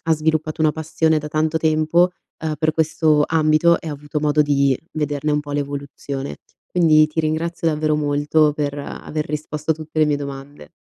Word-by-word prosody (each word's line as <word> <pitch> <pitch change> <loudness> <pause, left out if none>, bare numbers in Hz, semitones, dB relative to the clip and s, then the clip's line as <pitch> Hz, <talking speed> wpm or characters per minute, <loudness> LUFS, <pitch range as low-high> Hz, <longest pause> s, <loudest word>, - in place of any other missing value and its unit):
ha 165 - +1
sviluppato 155 0 -1
una 155 -1 +3
passione 160 0 0
da 150 0 -6
tanto 155 +1 0
tempo, 160 +3 +2 0.3
uhm, 155 -1 -1
per 155 -1 +1
questo 155 -1 +2
ambito 160 +1 +3
e - - -11
ha 150 - -3
avuto 145 +1 -4
modo 150 0 +2
di 140 -2 +2 0.2
vederne 150 -1 -2
un 150 0 +1
po' 145 -1 -8
l'evoluzione. 140 -1 -5 0.3
Quindi 155 -3 +4
ti 155 +1 -2
ringrazio 165 +2 -1
davvero 155 0 0
molto 150 +1 +2
per 145 -1 -3
aver 150 +1 -5
risposto 150 +1 -4
a - - +4
tutte 155 0 -4
le 155 - +6
mie 145 -1 +1
domande. 140 - -8
155 Hz, 185 wpm, -20 LUFS, 145-160 Hz, 0.3 s, le